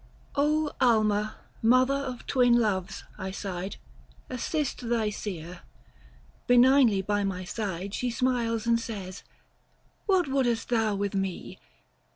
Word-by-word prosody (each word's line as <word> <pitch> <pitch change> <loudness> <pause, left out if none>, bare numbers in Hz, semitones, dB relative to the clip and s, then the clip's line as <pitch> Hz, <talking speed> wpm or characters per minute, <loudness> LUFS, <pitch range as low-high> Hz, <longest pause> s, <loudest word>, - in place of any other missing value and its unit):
alma 240 -8 +2 0.3
Mother 255 +4 +4
of 265 -3 -4
twin 245 -3 +4
Loves, 200 -4 -1 0.2
I 190 - -4
sighed, 190 -1 -5 0.6
Assist 255 -1 -2
thy 225 -3 +1
seer. 180 -4 -6 0.9
Benignly 245 -4 +5
by 205 +1 0
my 190 -2 -2
side 195 -1 -4
She 250 - -1
smiles 235 -2 0
and 230 0 +3
says, 200 -5 -6 0.4
" - - -39
What 375 -5 +3
wouldest 255 -4 0
thou 225 -3 +1
with 200 0 -2
me 195 -2 -3
225 Hz, 120 wpm, -27 LUFS, 195-250 Hz, 0.9 s, Benignly